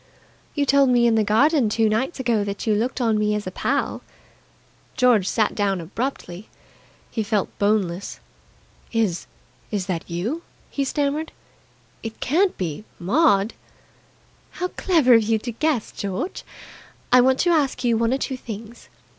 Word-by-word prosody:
"You 290 -2 +1
told 275 -1 +4
me 240 -1 +4
in 235 - +4
the 220 -1 +3
garden 250 +4 +3
two 225 +1 +2
nights 235 +9 -1
ago 235 -5 +1
that 200 0 -4
you 220 - +2
looked 235 +6 -1
on 225 -3 +2
me 210 0 +1
as 210 - -3
a 185 - -4
pal." - - -1 1.0
George 240 -7 +4
sat 215 0 +1
down 200 -2 0
abruptly. 195 0 -5 0.6
He 225 - -2
felt 205 -2 -1
boneless. 200 -3 0 0.7
"Is 215 -7 0 0.4
is 200 -3 -2
that 180 -3 -4
you?" 210 - -3 0.3
he 280 - -1
stammered. 290 +3 -1 0.7
"It 225 -1 -7
can't 360 +8 +1
be 170 0 -4
Maud!" 205 - +2 1.0
"How 360 0 -3
clever 320 -12 +3
of 225 - +7
you 220 +1 +2
to 240 +3 -5
guess. 275 -1 -1
George, 205 - -4 0.7
I 250 0 +7
want 260 +1 +3
to 350 - +3
ask 290 -6 +1
you 235 -2 +3
one 230 +1 +1
or 265 - +2
two 265 -1 -3
things. 225 0 -9
225 Hz, 155 wpm, -23 LUFS, 205-265 Hz, 1.0 s, of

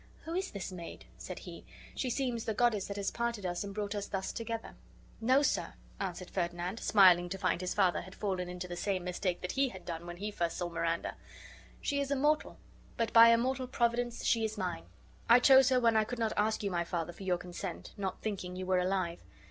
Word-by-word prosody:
"Who 325 - -5
is 380 +2 -1
this 195 -1 -6
maid?" 175 -2 -8
said - - -6
he; - - -9 0.3
"she 255 - -2
seems 245 -2 -1
the 220 - -1
goddess 225 -4 +2
that 200 - -5
has 200 -1 -1
parted 235 -4 -2
us, 175 +1 -2
and 200 - -6
brought 205 0 -3
us 205 -1 -3
thus 190 -1 -3
together." 230 0 -5 0.5
"No, 255 +5 +4
sir," - - 0 0.2
answered 185 -1 -4
Ferdinand, 175 +3 -2
smiling 180 -4 +6
to 195 - -3
find 185 - 0
his 180 - -2
father 190 -4 +3
had 185 +1 -11
fallen 185 -3 -2
into 180 0 -5
the 175 - -5
same 185 0 -1
mistake 180 0 -2
that 180 - -3
he 270 0 +2
had 190 -5 -11
done 170 0 -5
when 175 0 -7
he 205 +3 -4
first 170 -4 -2
saw 175 -1 -2
Miranda, 165 0 -2 0.6
"she 280 - 0
is 280 - -2
a 280 - +1
mortal, 300 +3 +1 0.4
but 230 -1 -1
by 230 0 +10
immortal 255 +3 +2
Providence 240 -1 0
she 230 -1 +3
is 220 0 -2
mine; 180 - -3 0.4
I 235 +2 +9
chose 265 0 +7
her 255 -1 +4
when 230 -2 +3
I 220 - +5
could 245 +3 -5
not 225 -2 0
ask 220 +1 +1
you, 200 - -1
my 170 -1 0
father, 170 0 -3
for - - -15
your 185 -2 +1
consent, 175 +1 -7
not 195 -2 -4
thinking 185 -4 -3
you 185 0 -4
were 185 0 +2
alive. 180 -2 0
200 Hz, 225 wpm, -32 LUFS, 180-230 Hz, 0.6 s, by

